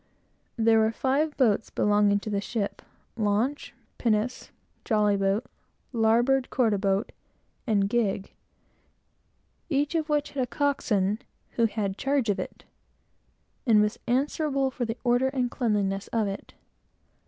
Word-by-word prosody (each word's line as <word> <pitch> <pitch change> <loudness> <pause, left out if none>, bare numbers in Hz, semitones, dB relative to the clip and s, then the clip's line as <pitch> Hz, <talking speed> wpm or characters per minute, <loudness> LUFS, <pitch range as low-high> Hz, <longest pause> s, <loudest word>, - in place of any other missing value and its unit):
There 225 -1 +4
were 220 0 +3
five 280 +6 0
boats 225 -5 +2
belonging 205 -1 +3
to 215 - -5
the 200 -1 0
ship, 205 -1 -3 0.3
launch, 225 +6 0 0.3
pinnace, 230 +2 0 0.3
jolly 210 -3 +2
boat, 195 +4 0 0.5
larboard 240 +4 +3
quarter 225 -6 +1
boat, 195 0 0 0.6
and 200 -3 +2
gig, 200 -3 -1 1.4
each 290 0 0
of 320 -2 -1
which 295 -1 0
had 275 - -2
a 250 - 0
coxswain, 215 -9 0 0.3
who 230 - +2
had 205 -3 -3
charge 275 -4 +1
of 200 - -3
it, - - -6 1.0
and 220 -3 +6
was 210 +1 +1
answerable 275 +1 0
for 245 -1 -3
the 225 +1 -4
order 245 +1 +3
and 255 -2 -1
cleanness 200 -5 0
of 225 -3 0
it. 195 0 -7
225 Hz, 130 wpm, -27 LUFS, 205-265 Hz, 1.4 s, and